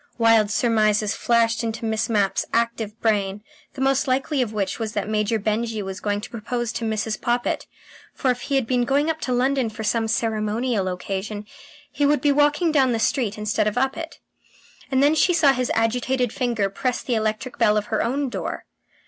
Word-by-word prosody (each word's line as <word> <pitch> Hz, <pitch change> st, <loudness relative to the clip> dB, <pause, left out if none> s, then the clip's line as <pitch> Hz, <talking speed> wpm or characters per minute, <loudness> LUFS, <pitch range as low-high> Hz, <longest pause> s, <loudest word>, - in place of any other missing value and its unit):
Wild 225 Hz, -3 st, +4 dB
surmises 215 Hz, -2 st, +2 dB
flashed 230 Hz, 0 st, +1 dB
into 230 Hz, 0 st, -3 dB
Miss 220 Hz, 0 st, -1 dB
Mapp's 205 Hz, -3 st, +1 dB
active 230 Hz, -2 st, -1 dB
brain, 205 Hz, -2 st, 0 dB, 0.3 s
the 265 Hz, -, -6 dB
most 270 Hz, +1 st, +2 dB
likely 265 Hz, +2 st, +1 dB
of 235 Hz, -4 st, -1 dB
which 205 Hz, -3 st, -2 dB
was 220 Hz, -1 st, -3 dB
that 205 Hz, -1 st, -2 dB
Major 215 Hz, +1 st, 0 dB
Benjy 215 Hz, +1 st, -1 dB
was 190 Hz, 0 st, -6 dB
going 205 Hz, 0 st, -1 dB
to -, -, -8 dB
propose 235 Hz, +1 st, -3 dB
to 230 Hz, -, -4 dB
Mrs. 220 Hz, 0 st, -2 dB
Poppit, 240 Hz, 0 st, -1 dB, 0.5 s
for 260 Hz, -, +1 dB
if 245 Hz, 0 st, -4 dB
he 280 Hz, -, -2 dB
had 265 Hz, -3 st, +2 dB
been 245 Hz, +1 st, +1 dB
going 285 Hz, +5 st, +2 dB
up 315 Hz, 0 st, -7 dB
to 255 Hz, -, -2 dB
London 255 Hz, 0 st, +1 dB
for 220 Hz, +1 st, -7 dB
some 225 Hz, +2 st, +1 dB
ceremonial 220 Hz, -1 st, 0 dB
occasion, 195 Hz, +3 st, -4 dB, 0.5 s
he 290 Hz, 0 st, -2 dB
would 295 Hz, +1 st, +3 dB
be 290 Hz, -, +2 dB
walking 295 Hz, +3 st, +3 dB
down 265 Hz, -5 st, +3 dB
the 225 Hz, -, -1 dB
street 225 Hz, -2 st, 0 dB
instead 210 Hz, 0 st, 0 dB
of 215 Hz, +3 st, -2 dB
up 265 Hz, +1 st, +1 dB
it. 330 Hz, 0 st, -7 dB, 0.7 s
And 265 Hz, 0 st, +2 dB
then 290 Hz, +2 st, +5 dB
she 345 Hz, +3 st, +3 dB
saw 295 Hz, -5 st, +5 dB
his 250 Hz, -1 st, -1 dB
agitated 245 Hz, +2 st, 0 dB
finger 235 Hz, -6 st, 0 dB
press 250 Hz, +6 st, -2 dB
the 250 Hz, -, -2 dB
electric 220 Hz, +3 st, -2 dB
bell 210 Hz, 0 st, +4 dB
of 210 Hz, -, -1 dB
her 220 Hz, -, +2 dB
own 270 Hz, +3 st, -1 dB
door. -, -, -5 dB
230 Hz, 200 wpm, -23 LUFS, 215-260 Hz, 0.7 s, then